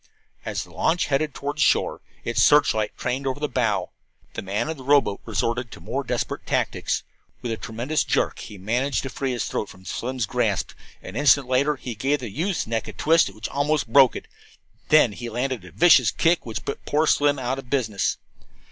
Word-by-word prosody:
As -, -, -2 dB
the -, -, -16 dB
launch 170 Hz, +2 st, +1 dB
headed 145 Hz, 0 st, 0 dB
toward 145 Hz, +2 st, -4 dB
shore, -, -, +2 dB, 0.2 s
its 120 Hz, -, 0 dB
searchlight 125 Hz, -8 st, +4 dB
trained 130 Hz, +2 st, -2 dB
over 130 Hz, +2 st, -2 dB
the 150 Hz, -, -1 dB
bow, 120 Hz, -6 st, 0 dB, 0.4 s
the -, -, -4 dB
man 100 Hz, +6 st, -2 dB
of 160 Hz, -1 st, -4 dB
the 130 Hz, -, -10 dB
rowboat 135 Hz, -7 st, +3 dB
resorted 115 Hz, +3 st, -1 dB
to -, -, -11 dB
more -, -, -3 dB
desperate -, -, -3 dB
tactics. -, -, -1 dB, 0.4 s
With 120 Hz, -, -2 dB
a -, -, 0 dB
tremendous 120 Hz, +8 st, -2 dB
jerk -, -, 0 dB
he 105 Hz, -, -9 dB
managed 120 Hz, +9 st, -1 dB
to 135 Hz, -, -5 dB
free 135 Hz, -1 st, -2 dB
his 120 Hz, -3 st, -2 dB
throat 105 Hz, -, -3 dB
from 95 Hz, 0 st, -15 dB
Slim's 125 Hz, +2 st, -3 dB
grasp. 110 Hz, -3 st, -1 dB, 0.3 s
An 90 Hz, -, -9 dB
instant 140 Hz, -1 st, +4 dB
later 135 Hz, +4 st, +2 dB
he 130 Hz, -3 st, -6 dB
gave 135 Hz, +7 st, 0 dB
the 120 Hz, -6 st, -7 dB
youth's 175 Hz, -, -1 dB
neck 115 Hz, 0 st, -2 dB
a -, -, -7 dB
twist 165 Hz, -4 st, +3 dB
which 105 Hz, +2 st, -6 dB
almost 140 Hz, -4 st, 0 dB
broke 135 Hz, -3 st, +7 dB
it. -, -, -7 dB, 0.6 s
Then 155 Hz, -7 st, +6 dB
he 120 Hz, +3 st, -6 dB
landed 125 Hz, -1 st, -2 dB
a -, -, -12 dB
vicious 150 Hz, -8 st, +6 dB
kick 165 Hz, +3 st, +1 dB
which 110 Hz, -, -5 dB
put 140 Hz, -, -4 dB
poor 150 Hz, +2 st, +2 dB
Slim 145 Hz, -1 st, +3 dB
out 130 Hz, +1 st, -2 dB
of 130 Hz, -, -11 dB
business. 110 Hz, -7 st, 0 dB
130 Hz, 200 wpm, -24 LUFS, 115-145 Hz, 0.6 s, broke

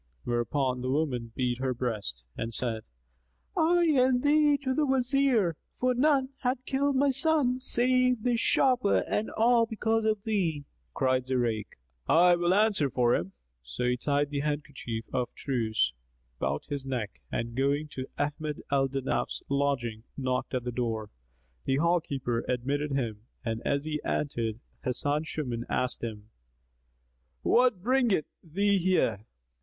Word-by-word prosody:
whereupon 125 Hz, +2 st, 0 dB
the 130 Hz, -, -2 dB
woman 130 Hz, -5 st, -1 dB
beat 125 Hz, -1 st, -1 dB
her 130 Hz, -1 st, -1 dB
breast 105 Hz, -, -3 dB
and 115 Hz, -1 st, -3 dB
said, 115 Hz, -3 st, -2 dB, 0.7 s
"I 345 Hz, +2 st, +3 dB
and 255 Hz, -2 st, +3 dB
thee 295 Hz, 0 st, +4 dB
to 260 Hz, -1 st, 0 dB
the 305 Hz, -, +1 dB
Wazir, 260 Hz, -, +2 dB, 0.2 s
for 255 Hz, 0 st, +1 dB
none 270 Hz, 0 st, +3 dB
hath 255 Hz, 0 st, -1 dB
killed 280 Hz, +1 st, +1 dB
my 275 Hz, +1 st, +3 dB
son 270 Hz, -2 st, +3 dB
save 250 Hz, -2 st, +2 dB
this 245 Hz, -2 st, +1 dB
sharper, 250 Hz, -5 st, +3 dB
and 210 Hz, -, -1 dB
all 230 Hz, +1 st, +3 dB
because 225 Hz, 0 st, 0 dB
of 215 Hz, -2 st, +1 dB
thee." 170 Hz, -10 st, -1 dB, 0.3 s
Cried 130 Hz, -1 st, +1 dB
Zurayk, 120 Hz, -5 st, -1 dB, 0.3 s
"I 175 Hz, +2 st, +6 dB
will 175 Hz, 0 st, +1 dB
answer 205 Hz, -9 st, +3 dB
for 120 Hz, -2 st, +2 dB
him." 95 Hz, +3 st, -1 dB, 0.3 s
So -, -, -5 dB
he 125 Hz, 0 st, +2 dB
tied 145 Hz, +3 st, 0 dB
the 140 Hz, -1 st, -1 dB
kerchief 140 Hz, -6 st, -4 dB
of 125 Hz, -1 st, -2 dB
truce 110 Hz, -, 0 dB, 0.5 s
about 70 Hz, +2 st, -1 dB
his 140 Hz, -2 st, -4 dB
neck 125 Hz, -6 st, -4 dB
and 115 Hz, 0 st, -3 dB
going 140 Hz, +3 st, +1 dB
to 130 Hz, -2 st, -6 dB
Ahmad 150 Hz, +1 st, -3 dB
al 135 Hz, -1 st, +3 dB
Danaf's 135 Hz, 0 st, -2 dB
lodging, 135 Hz, -6 st, 0 dB, 0.2 s
knocked 130 Hz, -1 st, -1 dB
at 125 Hz, -, -1 dB
the 125 Hz, -, -3 dB
door. 115 Hz, -3 st, -2 dB, 0.5 s
The 135 Hz, -, +2 dB
hall 170 Hz, +4 st, +3 dB
keeper 120 Hz, -5 st, -2 dB
admitted 140 Hz, +4 st, -1 dB
him 115 Hz, -4 st, -3 dB, 0.2 s
and 115 Hz, -1 st, -2 dB
as 140 Hz, 0 st, 0 dB
he 150 Hz, -1 st, -3 dB
entered 115 Hz, -5 st, -2 dB, 0.2 s
Hasan 145 Hz, +4 st, -1 dB
Shuman 125 Hz, -7 st, -3 dB
asked 125 Hz, -1 st, -1 dB
him, 110 Hz, -2 st, -6 dB, 1.1 s
"What 245 Hz, -7 st, +3 dB
bringeth 240 Hz, -, +2 dB, 0.2 s
thee 200 Hz, +4 st, +1 dB
here?" 170 Hz, -, +1 dB
145 Hz, 150 wpm, -29 LUFS, -, 1.1 s, I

